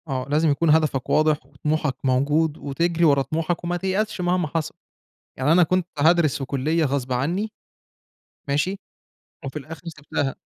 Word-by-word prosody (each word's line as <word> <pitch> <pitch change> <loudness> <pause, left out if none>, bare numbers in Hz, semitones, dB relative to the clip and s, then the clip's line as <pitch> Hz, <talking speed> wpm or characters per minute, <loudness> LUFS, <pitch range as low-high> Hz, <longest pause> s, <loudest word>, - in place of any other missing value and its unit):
آه، 130 -2 -3
لازم 155 +2 +3
يكُون 160 +3 +1
هدفك 150 -4 +2
واضح، 155 -3 +2
وطموحك 145 0 -2
موجود، 145 +4 +1
وتجري 165 +4 0
ورا 140 -3 +4
طموحك 160 +5 -2
وما 175 +1 -1
تيأسش 190 +2 -1
مهما 175 -2 +1
حصَل. 155 0 -3 0.6
يعني 135 +4 +1
أنا 175 +2 +6
كنت 180 +1 0
هادرِس 160 -1 +4
في 135 - -4
كلية 155 +5 0
غصب 135 -2 -2
عني، 175 - -1 1.0
ماشي، 150 +8 0 0.7
وفي 135 +3 -4
الآخر 155 +3 -10
سِبتها. 145 -3 -3
155 Hz, 150 wpm, -23 LUFS, 140-170 Hz, 1.0 s, أنا